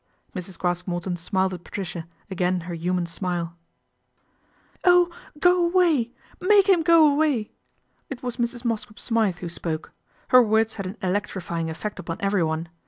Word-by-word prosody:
Mrs. 180 -1 -6
Craske 175 0 -1
Morton 175 0 -2
smiled 190 +2 0
at 175 -1 -8
Patricia, 175 -4 -5 0.2
again 180 -1 0
icr 170 +1 -6
human 175 +1 -1
smile 170 -1 -3 0.7
" - - -37
Oh! 355 -1 +5 0.3
go 355 +1 +4
away, 340 -9 +3 0.3
make 400 +1 +5
him 375 -4 +5
go 330 0 +6
away! 285 -7 +1 0.3
" - - -44
It 265 -3 -7
was 245 -1 -3
trs. 240 0 -2
Mosscrop 220 -2 -2
Smythe 220 -6 0
who 175 - -4
spoke. 165 -2 -4 0.4
Her 255 -1 +8
words 220 -1 +1
lad 195 - -3
an 195 +5 -7
electrifying 185 -3 -2
effect 205 +6 -5
upon 165 - -5
everyone. 170 -5 0
195 Hz, 160 wpm, -24 LUFS, 175-250 Hz, 0.7 s, Her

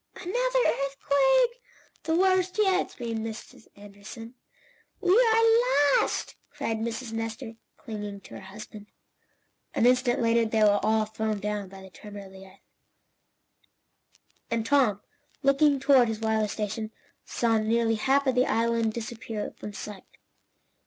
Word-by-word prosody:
"Another 365 +3 -6 0.3
earthquake! 475 - +2 0.4
The 320 - +1
worst 370 +1 +2
yet!" 385 -3 +2
screamed 230 -2 -5
Mrs. 225 0 -9
Anderson. 205 +3 -11 0.7
"We 365 -3 +1
are 455 - +4
lost!" - - -3 0.2
cried 225 - -3
Mrs. 230 +1 -4
Nestor, 225 +1 -5 0.2
clinging 205 -2 -7
to - - -14
her - - -8
husband. 210 +2 -11 0.9
An - - +2
instant 250 0 +3
later 230 0 +3
they 220 -1 +1
were 205 -1 +4
all 220 0 +2
thrown 220 0 -3
down 205 -1 -3
by 190 0 -12
the 190 - -13
tremor 205 +1 -10
of 190 - -14
the 190 0 -13
earth, 190 +1 -20 1.9
and 230 -1 -1
Tom, 230 -7 +2 0.4
looking 275 +1 +3
toward 265 -3 +5
his 220 -1 -3
wireless 220 -2 0
station, 215 +1 -4 0.3
saw 225 -2 0
nearly 225 +1 +1
half 270 +5 +2
of 260 - +2
the 250 +1 +2
island 230 -1 +1
disappear 225 -2 -5
from 210 - -8
sight. 205 -1 -10
225 Hz, 140 wpm, -27 LUFS, 215-275 Hz, 1.9 s, toward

